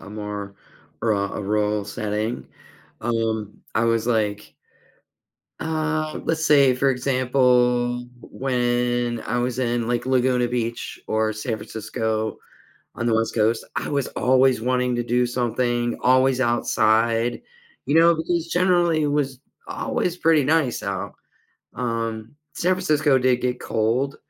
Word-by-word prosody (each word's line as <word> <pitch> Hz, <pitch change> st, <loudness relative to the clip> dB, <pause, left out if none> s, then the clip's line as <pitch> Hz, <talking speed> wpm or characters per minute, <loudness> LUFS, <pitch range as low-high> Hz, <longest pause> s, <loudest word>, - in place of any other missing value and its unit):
uh, -, -, -13 dB
a -, -, -10 dB
more 105 Hz, -1 st, -6 dB, 0.5 s
ru 110 Hz, -3 st, +1 dB
a 100 Hz, +1 st, -3 dB
rural 105 Hz, 0 st, 0 dB
setting, 105 Hz, +3 st, -3 dB, 0.6 s
um, 110 Hz, -2 st, -2 dB
I 110 Hz, -, +3 dB
was 115 Hz, -1 st, +1 dB
like 105 Hz, -3 st, -1 dB, 1.1 s
Uh, 155 Hz, -1 st, -2 dB
let's 160 Hz, -1 st, 0 dB
say, 140 Hz, -3 st, +6 dB
for 135 Hz, +2 st, +1 dB
example, 125 Hz, -2 st, +2 dB
when 120 Hz, -2 st, -1 dB
I 120 Hz, -, -2 dB
was 120 Hz, 0 st, -2 dB
in, 120 Hz, -2 st, -1 dB
like, 120 Hz, 0 st, -1 dB
Laguna 125 Hz, -1 st, +2 dB
Beach 120 Hz, -1 st, -4 dB
or 110 Hz, 0 st, +1 dB
San 110 Hz, +1 st, -3 dB
Francisco 110 Hz, 0 st, -3 dB, 0.6 s
on 120 Hz, -, -3 dB
the 115 Hz, -, +2 dB
West 115 Hz, 0 st, 0 dB
Coast, 110 Hz, +1 st, +1 dB
I -, -, -3 dB
was 140 Hz, -2 st, 0 dB
always 130 Hz, -1 st, +3 dB
wanting 125 Hz, +1 st, 0 dB
to 120 Hz, -, 0 dB
do 120 Hz, +1 st, +1 dB
something, 120 Hz, 0 st, -1 dB
always 130 Hz, +1 st, +3 dB
outside, 115 Hz, -1 st, +1 dB, 0.5 s
you 145 Hz, -, 0 dB
know, 165 Hz, +1 st, +6 dB
because 165 Hz, +1 st, -2 dB
generally 175 Hz, -3 st, +3 dB
it -, -, +1 dB
was 140 Hz, -3 st, -1 dB, 0.3 s
always 175 Hz, -1 st, -2 dB
pretty 160 Hz, -4 st, +3 dB
nice 150 Hz, -4 st, +1 dB
out. 95 Hz, -2 st, -4 dB, 0.6 s
Um, 115 Hz, 0 st, -3 dB, 0.2 s
San 185 Hz, +2 st, +1 dB
Francisco 155 Hz, -6 st, +2 dB
did 125 Hz, -1 st, +2 dB
get 125 Hz, 0 st, -2 dB
cold, 120 Hz, +6 st, 0 dB
120 Hz, 135 wpm, -23 LUFS, 115-135 Hz, 1.1 s, say